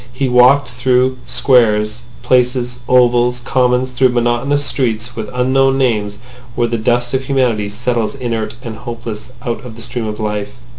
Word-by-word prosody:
He 130 +2 -2
walked 125 +3 +5
through 125 +1 +1
Squares, 110 -3 +2 0.2
Places, 125 -1 +1
Ovals, 125 -1 +3
Commons, 125 0 +1
through 130 +1 +3
monotonous 125 +4 0
streets 120 -3 -2
with 110 -2 -5
unknown 135 +2 +2
names 105 -6 0 0.4
where 120 -1 +1
the 115 0 -2
dust 120 +2 0
of 130 0 -1
humanity 125 -7 0
settles 120 +2 -2
inert 115 -4 -3
and 115 -2 -6
hopeless 115 -1 -7
out 120 +2 -3
of 120 -3 -9
the 115 - -10
stream 115 -1 -4
of 105 +1 -5
life. 105 - -3
120 Hz, 155 wpm, -16 LUFS, 115-130 Hz, 0.4 s, walked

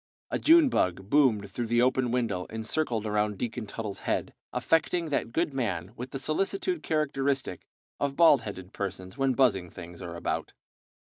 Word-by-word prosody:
A - - 0
June 325 -2 +6
bug 95 - 0
boomed 115 -9 +3
through 120 +3 -3
the 120 +1 +3
open 130 -1 +2
window 115 -7 -1
and 110 0 -5
circled 115 -5 0
around 105 -1 0
Deacon 115 +1 -4
Tuttle's 105 -1 -5
head, - - -2 0.2
affecting 165 +1 +1
that 135 -5 -1
good 160 +2 0
man 100 -7 -2
with 125 +2 -6
the 135 - -5
solicitude 195 - -1
characteristic 140 - -1 0.3
of 140 -1 -1
bald 155 -6 +6
headed 95 -4 -8
persons 95 -1 -5
when 135 -1 +1
buzzing 105 -9 +2
things 85 0 -10
are 85 -2 -6
about. 85 - -3
120 Hz, 165 wpm, -28 LUFS, 100-140 Hz, 0.3 s, June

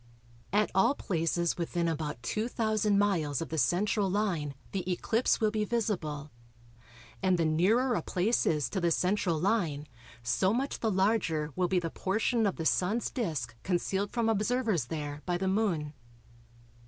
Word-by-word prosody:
At 210 +2 +2
all 230 +9 +4
places 170 - -1
within 170 0 -1
about 150 -6 -3
2000 215 - 0
miles 170 -9 +1
of 165 - -4
the 160 - -1
central 195 - +2
line 180 -8 -1 0.2
the 185 -1 -2
eclipse 225 +6 +1
will 215 -1 +2
be 215 -1 0
visible, 170 -10 -2 0.9
and 185 -2 +3
the 165 - +1
nearer 210 +11 +3
a - - 0
place 205 +6 +1
is 150 -5 +1
to 190 - -1
the 170 - +2
central 180 -1 +1
line, 170 -6 0 0.4
so 115 - +2
much 270 +3 -2
the 225 - 0
larger 185 -7 +1
will 180 -1 +1
be 185 +1 +1
the 165 -2 -1
portion 220 +3 +1
of 195 - -1
the 160 - -4
Sun's 205 +8 +1
disc 160 - -3
concealed 190 +2 -1
from 235 -2 0
observers 220 - +1
there 145 +1 -5
by 175 -1 +1
the 190 +1 -2
Moon. 185 -7 0
185 Hz, 160 wpm, -30 LUFS, 160-215 Hz, 0.9 s, all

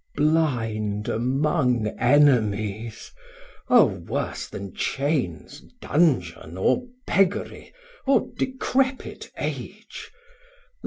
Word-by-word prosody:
Blind 115 -10 0
among 130 0 +1
enemies, 115 -5 +2 0.6
O 245 -3 +7
worse 90 -5 -4
then 100 -2 -8
chains, 135 - -2 0.2
Dungeon, 90 - 0
or 245 - +1 0.2
beggery, 195 +2 0 0.4
or 275 - +3
decrepit 260 0 -1
age! - - -6
125 Hz, 70 wpm, -24 LUFS, 105-160 Hz, 0.6 s, O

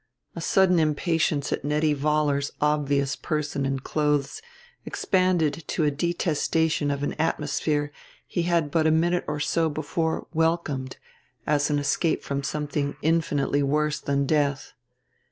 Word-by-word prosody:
A 170 - -5
sudden 180 0 +3
impatience 155 -1 +1
at - - -3
Nettie 150 +1 +1
Vollar's 145 -1 +1
obvious 140 -2 +1
person 150 -3 -2
and 135 -1 -2
clothes 150 - 0 0.4
expanded 180 -4 +1
to 160 - -1
a 150 - +3
detestation 160 -1 0
of 140 0 -2
an - - -1
atmosphere 150 -1 0 0.3
he 175 - -2
had 170 -3 +1
but 160 0 +2
a - - +5
minute 170 +3 +2
or 150 -1 -2
so 160 +2 +1
before 160 +1 -2
welcomed 160 -5 -1 0.5
as 145 0 +1
an 150 - +1
escape 145 +3 0
from 140 0 -2
something 145 0 -2
infinitely 150 -3 +1
worse 150 +1 +1
than 140 0 0
death. 140 -2 0
150 Hz, 135 wpm, -25 LUFS, 145-160 Hz, 0.5 s, a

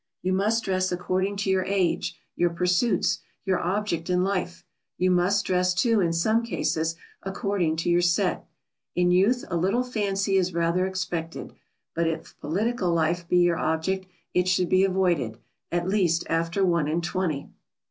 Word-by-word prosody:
You 185 - +1
must 215 +4 +1
dress 185 -1 0
according 185 +3 -1
to 195 -1 0
your 190 -1 +2
age, 190 -3 0 0.2
your 175 - +2
pursuits, 180 +6 +1 0.3
your 190 -2 +1
object 180 -2 -2
in 180 0 +2
life; 185 -2 -2 0.3
you 185 0 +2
must 185 +3 +2
dress, 180 0 +1
too, 225 +2 +3
in 170 -2 +1
some 215 +8 +2
cases, 165 -8 -1 0.3
according 195 -4 -1
to 165 +2 -1
your 175 0 +4
set. 175 0 +1 0.5
In 180 0 +3
youth 205 +8 +3
a - - 0
little 195 +9 +1
fancy 200 -5 0
is 185 -2 0
rather 170 +2 +1
expected, 175 -3 -4 0.4
but 165 0 0
if 165 0 -4
political 195 +3 -1
life 170 +1 0
be 180 - +3
your 175 -2 +3
object, 185 +4 -1 0.3
it 180 0 +2
should 180 -1 +2
be 185 +1 +4
avoided 175 -12 +1 0.3
at 175 +1 -1
least 180 -4 +1
after 165 +4 0
one 170 -4 +1
and 165 +3 -1
twenty. 170 -5 -2
180 Hz, 165 wpm, -26 LUFS, 170-195 Hz, 0.5 s, your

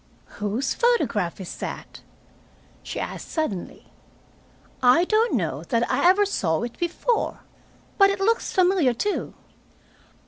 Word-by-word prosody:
"Whose 220 +6 -1
photograph 235 - +1
is 185 - -7
that?" - - -7 0.8
she - - -6
asked - - -6
suddenly. 270 - -4 0.9
"I 255 +7 +5
don't 445 - +2
know 160 - -2
that 235 +5 0
I 285 +7 +4
ever 405 +2 +4
saw 165 - -1
it 240 0 -5
before. 350 +7 -1 0.6
But 395 0 +7
it 395 -1 -2
looks 455 +4 +1
familiar, 360 -9 +3
too." 410 - -2
285 Hz, 125 wpm, -24 LUFS, -, 0.9 s, But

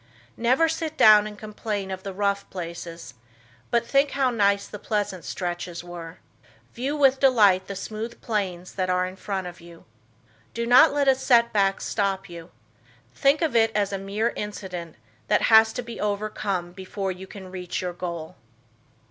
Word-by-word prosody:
Never 255 +8 +3
sit 320 -1 -3
down 210 -1 +7
and 210 -1 -9
complain 210 -2 -4
of 190 0 -5
the 195 - -6
rough 200 +1 -1
places, 170 -6 -7 0.6
but 235 0 +1
think 275 +3 +3
how 265 -2 +2
nice 200 -3 +2
the 210 - -9
pleasant 205 -5 -2
stretches 175 -1 -4
were. 170 -1 -9 0.6
View 270 +5 -2
with 270 -2 +4
delight 210 -9 +4
the 200 - -5
smooth 220 +4 -6
plains 185 -5 -3
that 185 -1 -2
are 180 0 +2
in 185 +1 -7
front 195 -1 -4
of 175 -1 -9
you. 170 -1 -15 0.7
Do 235 0 -1
not 245 +2 +7
let 285 -1 +1
a 270 - +7
setback 235 -7 +2
stop 195 -2 -1
you. 170 -1 -10 0.6
Think 285 +3 +2
of 310 -7 0
it 225 -1 +4
as 205 -1 0
a 195 - -2
mere 205 +4 -1
incident 185 -5 -6 0.3
that 210 - +2
has 220 0 +8
to 245 - -4
be 235 0 -8
overcome 200 -3 -2
before 190 +1 -4
you 185 +1 -9
can 190 -2 -10
reach 180 -1 -4
your 180 -1 -3
goal. 170 -2 -6
200 Hz, 170 wpm, -25 LUFS, 185-230 Hz, 0.7 s, has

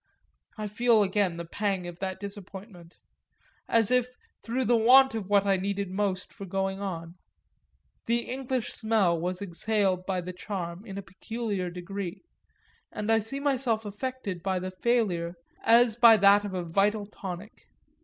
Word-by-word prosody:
I 215 - -4
feel 220 +1 +3
again 190 -3 0
the 170 - -5
pang 195 +1 -2
of 175 0 -8
that 190 -1 -4
disappointment 195 -3 -9 0.7
as 230 -1 +3
if 250 -1 +3 0.3
through 250 +3 -2
the 240 +2 +4
want 255 +4 +6
of 215 -4 -4
what 200 -1 +4
I 195 -1 +3
needed 200 0 -2
most 190 -1 -2
for 195 - -9
going 195 +1 -2
on; 170 -3 -5 0.9
the 235 +1 +2
English 260 -1 -3
smell 215 -7 +1
was 180 +3 -3
exhaled 190 0 0
by 190 -2 0
The 180 +1 -6
Charm 180 -1 -5
in 195 -1 -7
a 200 - -5
peculiar 205 -1 -4
degree, 180 - -6 0.7
and 210 +1 -2
I 225 - +5
see 225 +6 -3
myself 255 -6 0
affected 210 -3 -5
by 190 +1 -1
the 185 +1 -4
failure 185 -5 0 0.3
as 230 -1 +5
by 230 -1 +8
that 200 0 +5
of 195 -2 -5
a 180 - -2
vital 200 +5 +1
tonic. 195 0 -9
200 Hz, 160 wpm, -28 LUFS, 185-225 Hz, 0.9 s, by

